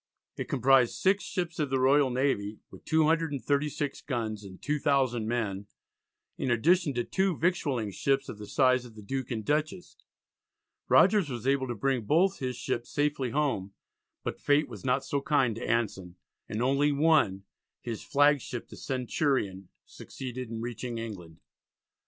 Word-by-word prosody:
It -, -, -5 dB
comprised 130 Hz, -2 st, +4 dB
six 195 Hz, +2 st, +2 dB
ships 175 Hz, -4 st, -4 dB
of 150 Hz, -2 st, 0 dB
the 135 Hz, 0 st, +1 dB
Royal 135 Hz, +1 st, +4 dB
Navy 125 Hz, -5 st, 0 dB
(with -, -, -14 dB
236 150 Hz, -2 st, 0 dB
guns 110 Hz, -6 st, -3 dB
and 95 Hz, -2 st, -11 dB
2,000 135 Hz, -6 st, +1 dB
men), 105 Hz, -4 st, -2 dB, 0.7 s
in 130 Hz, -, -1 dB
addition 150 Hz, +5 st, +3 dB
to 120 Hz, -, 0 dB
two 190 Hz, 0 st, 0 dB
victualling 145 Hz, -, 0 dB
ships 135 Hz, +6 st, 0 dB
of 105 Hz, -, -8 dB
the 105 Hz, -, -8 dB
size 130 Hz, -2 st, +3 dB
of 120 Hz, -3 st, -13 dB
the 105 Hz, -, -11 dB
Duke 130 Hz, +4 st, -4 dB
and 110 Hz, -4 st, -4 dB
Dutchess. 155 Hz, -, -2 dB, 0.9 s
Rogers 205 Hz, -8 st, +5 dB
was 120 Hz, -3 st, -5 dB
able 135 Hz, -1 st, +2 dB
to 120 Hz, -, -3 dB
bring 130 Hz, +3 st, 0 dB
both 185 Hz, -, +2 dB
his 130 Hz, -1 st, -3 dB
ships 120 Hz, 0 st, -3 dB
safely 145 Hz, -3 st, 0 dB
home, 115 Hz, -8 st, -1 dB, 0.5 s
but -, -, -5 dB
fate 145 Hz, +1 st, +3 dB
was 110 Hz, -6 st, -10 dB
not 130 Hz, +1 st, +1 dB
so 140 Hz, -, -1 dB
kind 135 Hz, -5 st, +2 dB
to -, -, -5 dB
Anson, 95 Hz, -6 st, -1 dB, 0.3 s
and 110 Hz, +3 st, -2 dB
only 140 Hz, +3 st, +3 dB
one, 140 Hz, -10 st, +3 dB, 0.4 s
his 115 Hz, -3 st, -5 dB
flagship 145 Hz, -4 st, +1 dB
the -, -, -11 dB
Centurion, 125 Hz, -, -1 dB, 0.2 s
succeeded 130 Hz, -2 st, -7 dB
in 115 Hz, -1 st, -5 dB
reaching 120 Hz, 0 st, -5 dB
England. 95 Hz, -8 st, -7 dB
130 Hz, 155 wpm, -29 LUFS, 115-145 Hz, 0.9 s, Rogers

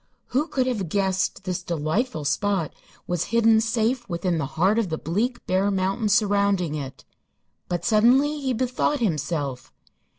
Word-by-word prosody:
Who 280 Hz, +5 st, 0 dB
could 260 Hz, -5 st, 0 dB
have 215 Hz, -9 st, -2 dB
guessed 190 Hz, +1 st, 0 dB
this 185 Hz, -2 st, -3 dB
delightful 165 Hz, -, -2 dB
spot 185 Hz, +2 st, 0 dB, 0.3 s
was 175 Hz, -1 st, -1 dB
hidden 225 Hz, -1 st, +4 dB
safe 235 Hz, +2 st, 0 dB
within 170 Hz, -1 st, -1 dB
the 140 Hz, -, -2 dB
heart 195 Hz, +7 st, +3 dB
of 215 Hz, -6 st, -1 dB
the 160 Hz, -, -2 dB
bleak, 225 Hz, +11 st, -2 dB
bare 190 Hz, +2 st, +1 dB
mountain 195 Hz, +3 st, 0 dB
surrounding 200 Hz, -5 st, +2 dB
it? 135 Hz, -3 st, -6 dB, 0.6 s
But 175 Hz, -1 st, -2 dB
suddenly 255 Hz, +7 st, +4 dB
he 270 Hz, -2 st, -1 dB
bethought 255 Hz, +4 st, 0 dB
himself. 150 Hz, -, -2 dB
200 Hz, 145 wpm, -24 LUFS, 170-235 Hz, 0.6 s, hidden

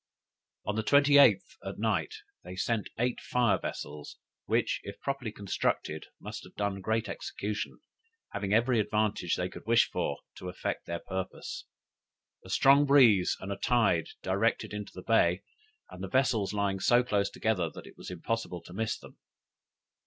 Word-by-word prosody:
"On 105 Hz, -, -1 dB
the 110 Hz, -, +1 dB
28th, 145 Hz, -, +5 dB
at -, -, -6 dB
night -, -, 0 dB, 0.3 s
they 90 Hz, -, -8 dB
sent 105 Hz, +2 st, -1 dB
eight 125 Hz, +1 st, 0 dB
fire 120 Hz, -4 st, +2 dB
vessels, 75 Hz, 0 st, -6 dB, 0.3 s
which, -, -, +1 dB
if -, -, -9 dB
properly 135 Hz, -5 st, -3 dB
constructed, 95 Hz, -6 st, -2 dB
must -, -, -7 dB
have -, -, -15 dB
done 100 Hz, -1 st, -2 dB
great 110 Hz, +3 st, 0 dB
execution, 105 Hz, +1 st, -4 dB, 0.5 s
having 100 Hz, -1 st, -3 dB
every 115 Hz, +2 st, +3 dB
advantage 105 Hz, -4 st, 0 dB
they 90 Hz, -, -1 dB
could 90 Hz, -, -11 dB
wish 115 Hz, 0 st, +4 dB
for -, -, -1 dB, 0.2 s
to 90 Hz, -, -6 dB
effect 90 Hz, -, -4 dB
their 85 Hz, 0 st, -3 dB
purpose; 95 Hz, 0 st, -5 dB, 0.8 s
a -, -, -13 dB
strong 140 Hz, +1 st, +5 dB
breeze 120 Hz, -10 st, +5 dB
and 100 Hz, +1 st, -4 dB
tide 115 Hz, -9 st, +3 dB, 0.2 s
directed 100 Hz, +3 st, 0 dB
into 105 Hz, -1 st, -5 dB
the 90 Hz, -, -10 dB
bay, 90 Hz, -5 st, +3 dB, 0.5 s
and 90 Hz, -, -8 dB
the -, -, -3 dB
vessels 125 Hz, -6 st, +2 dB
lying 100 Hz, -2 st, 0 dB
so 120 Hz, +5 st, +4 dB
close 100 Hz, -4 st, +1 dB
together, 100 Hz, -6 st, 0 dB
that -, -, -11 dB
it -, -, -13 dB
was -, -, -9 dB
impossible 90 Hz, 0 st, -3 dB
to 90 Hz, -, -12 dB
miss 110 Hz, +3 st, -1 dB
them. -, -, -15 dB
105 Hz, 160 wpm, -30 LUFS, 95-120 Hz, 0.8 s, 28th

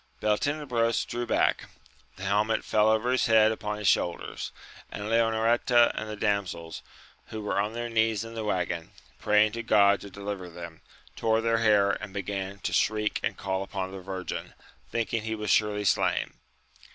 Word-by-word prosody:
Beltenebros 115 Hz, +1 st, 0 dB
drew 120 Hz, 0 st, -4 dB
back; -, -, +1 dB, 0.5 s
the 95 Hz, -, -10 dB
helmet 105 Hz, +3 st, +1 dB
fell 110 Hz, 0 st, +3 dB
over 110 Hz, +3 st, +2 dB
his 130 Hz, -, +2 dB
head 110 Hz, -1 st, +5 dB
upon 105 Hz, -1 st, -4 dB
his 105 Hz, -2 st, -2 dB
shoulders, 85 Hz, 0 st, 0 dB, 0.4 s
and 105 Hz, -, -5 dB
Leonoreta 115 Hz, +1 st, +3 dB
and 110 Hz, -, -5 dB
the 110 Hz, -, -4 dB
damsels, 100 Hz, -6 st, -2 dB, 0.5 s
who 110 Hz, -, -6 dB
were 105 Hz, -, -1 dB
on 105 Hz, +2 st, -3 dB
their 120 Hz, 0 st, -3 dB
knees 110 Hz, -2 st, +1 dB
in 115 Hz, -, -9 dB
the 115 Hz, -1 st, -4 dB
waggon, 90 Hz, -5 st, -2 dB, 0.3 s
praying 105 Hz, 0 st, +3 dB
to 115 Hz, +2 st, -4 dB
God 100 Hz, -3 st, +4 dB
to 100 Hz, -, -9 dB
deliver 100 Hz, -2 st, -6 dB
them, 85 Hz, -1 st, -10 dB, 0.3 s
tore 110 Hz, 0 st, +1 dB
their 115 Hz, 0 st, +1 dB
hair 105 Hz, -3 st, +4 dB
and 100 Hz, 0 st, -5 dB
began 100 Hz, 0 st, -4 dB
to -, -, -3 dB
shriek 105 Hz, -1 st, +1 dB
and -, -, -2 dB
call 95 Hz, -1 st, -2 dB
upon 95 Hz, -1 st, -4 dB
the 95 Hz, -1 st, -8 dB
Virgin, 95 Hz, 0 st, -6 dB, 0.3 s
thinking 115 Hz, -1 st, -1 dB
he 110 Hz, +1 st, -3 dB
was 105 Hz, -2 st, -2 dB
surely 105 Hz, -1 st, +2 dB
slain. -, -, +1 dB
105 Hz, 170 wpm, -27 LUFS, 100-115 Hz, 0.5 s, head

